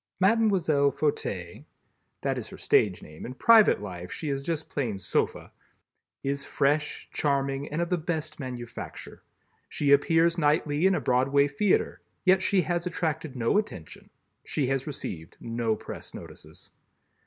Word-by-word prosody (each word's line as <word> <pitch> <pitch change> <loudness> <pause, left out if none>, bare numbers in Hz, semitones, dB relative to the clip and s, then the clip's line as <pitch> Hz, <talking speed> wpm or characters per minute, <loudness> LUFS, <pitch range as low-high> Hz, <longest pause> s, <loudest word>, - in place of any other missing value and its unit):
Mlle. 220 +4 +4
Fauteuil 140 - 0 0.6
(that - - -1
is - - -7
her - - -10
stage 95 -4 +2
name, 75 +1 -11
in 125 - -6
private 220 - +6
life 90 -3 -7
she 155 - -4
is 135 -1 -1
just 160 +1 -3
plain 120 -8 -2
Sofa) 95 - -2 0.7
is 140 0 -1
fresh, 150 +2 0
charming 140 -1 0
and 155 +3 -1
of 170 - -5
the 180 - +2
best 155 -1 -4
manufacture. 125 -3 -7 0.5
She 145 -1 0
appears 165 +4 +4
nightly 150 +2 +2
in 190 - +3
a - - +1
Broadway 135 +3 +3
theater, 180 +8 +1 0.2
yet 190 0 +5
she 190 -1 +2
has 175 +2 -1
attracted 160 -4 -2
no 120 - +2
attention. 90 - -7 0.3
She 145 - -1
has 135 +1 -1
received 85 - -6
no 115 -1 -1
press - - -9
notices. - - -11
145 Hz, 145 wpm, -27 LUFS, 125-165 Hz, 0.7 s, private